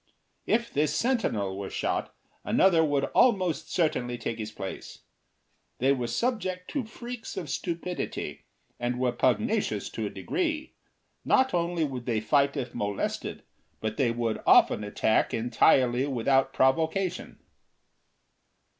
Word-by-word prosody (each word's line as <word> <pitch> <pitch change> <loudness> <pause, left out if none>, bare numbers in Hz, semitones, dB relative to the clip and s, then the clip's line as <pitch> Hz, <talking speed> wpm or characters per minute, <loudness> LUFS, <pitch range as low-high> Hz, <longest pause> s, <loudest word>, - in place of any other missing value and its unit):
If 235 +1 +1
this 150 0 +1
sentinel 115 - 0
were 100 0 -5
shot, - - -2 0.3
another 175 -4 +4
would 145 -3 +1
almost 185 - +2
certainly 125 -8 0
take 115 0 -4
his 110 0 -4
place. 95 -2 -8 0.7
They 135 +2 +3
were 125 -3 0
subject 185 - -2
to 275 -5 -2
freaks 240 +1 -8
of 150 -5 -4
stupidity, 175 +2 -4 0.3
and 120 +1 -2
were 125 -1 +2
pugnacious 205 - 0
to - - -3
a - - -4
degree. 320 -4 -2 0.5
Not 260 0 +3
only 170 -1 0
would 130 -4 -4
they 115 -3 +1
fight 140 +6 +2
if 125 -3 -4
molested, 100 -1 -3 0.4
but 110 0 -3
they 135 -5 +2
would 115 -1 -2
often 105 - +5
attack 105 +1 +1
entirely 120 +2 +3
without 135 +1 +2
provocation. 160 +8 0
140 Hz, 130 wpm, -28 LUFS, 120-185 Hz, 0.7 s, often